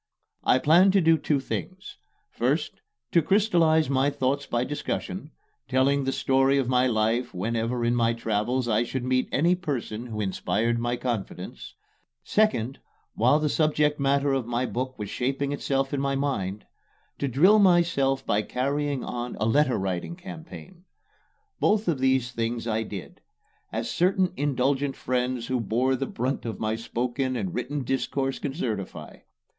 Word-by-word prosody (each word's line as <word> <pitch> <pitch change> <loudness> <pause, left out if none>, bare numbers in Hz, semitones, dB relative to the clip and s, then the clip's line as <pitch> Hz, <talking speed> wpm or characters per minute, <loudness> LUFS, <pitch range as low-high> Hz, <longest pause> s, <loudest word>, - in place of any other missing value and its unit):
I - - +4
planned 175 +8 +5
to 200 - +5
do 165 -1 +5
two 150 -2 0
things: 185 +7 -6 0.3
first, - - -1 0.3
to 170 - +5
crystallize 170 -6 +3
my 135 +1 +2
thoughts 140 0 -1
by 120 0 0
discussion 150 +4 -4 0.4
telling 135 +1 +2
the 135 - +1
story 135 +1 +2
of 135 -3 +1
my 125 0 +3
life 115 +1 0
whenever 115 +5 -1
in 120 - +2
my 115 -1 +2
travels 120 +2 -1
I 110 -1 +2
should 120 +1 -3
meet 130 0 +1
any 170 +5 +3
person 130 -9 -4
who 110 -2 -5
inspired 110 +3 0
my 120 +1 -1
confidence; 115 - -5 0.5
second, 135 - +1 0.3
while 125 +6 +4
the 155 0 0
subject 150 -1 +1
matter 140 0 +2
of 130 -4 -1
my 120 +1 0
book 130 +2 -4
was 105 -3 -5
shaping 135 +2 -1
itself 135 -1 -1
in 140 - 0
my 140 0 0
mind, 105 -8 -2 0.5
to 140 - 0
drill 180 - +5
myself 170 -8 +3
by 105 - +2
carrying 140 +4 -1
on 120 0 -5
a 110 - +1
letter 135 +3 +3
writing 95 - -3
campaign. 180 0 -11 0.8
Both 215 +1 +2
these 130 -5 +1
things 115 0 -2
I 110 -1 0
did 100 -4 -8 0.5
as - - -3
certain 185 +1 +1
indulgent 140 0 0
friends 125 -1 -1
who 130 +1 -1
bore 125 +5 +1
the 135 +1 -3
brunt 130 +3 -2
of 115 -2 -5
my 110 0 -1
spoken 125 +3 -2
and 100 -7 -3
written 145 -1 -3
discourse 135 +1 -1
can 140 -1 -4
certify. 110 - -4
130 Hz, 155 wpm, -26 LUFS, 120-145 Hz, 0.8 s, planned